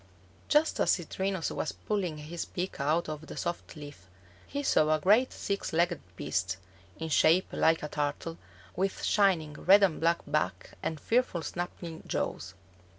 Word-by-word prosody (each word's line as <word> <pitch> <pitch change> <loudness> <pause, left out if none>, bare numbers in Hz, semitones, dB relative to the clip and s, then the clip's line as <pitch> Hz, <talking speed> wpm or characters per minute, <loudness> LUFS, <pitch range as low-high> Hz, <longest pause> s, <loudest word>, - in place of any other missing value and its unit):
Just 300 +2 +3
as - - +4
Citrinus 190 +1 -2
was - - -2
pulling 185 -7 -2
his 155 +3 -5
beak 180 -2 -4
out 155 +5 +1
of 155 0 -6
the - - -8
soft 175 - -4
leaf, 145 - -11 0.4
he 285 +1 -3
saw 155 - +4
a - - -2
great 215 +10 +4
six 200 -4 -3
legged 170 0 +2
beast, 90 +4 -2 0.4
in 160 - -4
shape 165 +4 +5
like 160 -1 +3
a - - -2
turtle, 150 +3 -3 0.4
with 190 +1 -1
shining 180 -7 +3
red 195 +6 +5
and 180 -5 +2
black 170 +1 +2
back - - -1
and 160 -2 -3
fearful 225 - +1
snapping 175 -1 -5
jaws. 95 -1 -3
165 Hz, 155 wpm, -30 LUFS, 150-190 Hz, 0.4 s, shape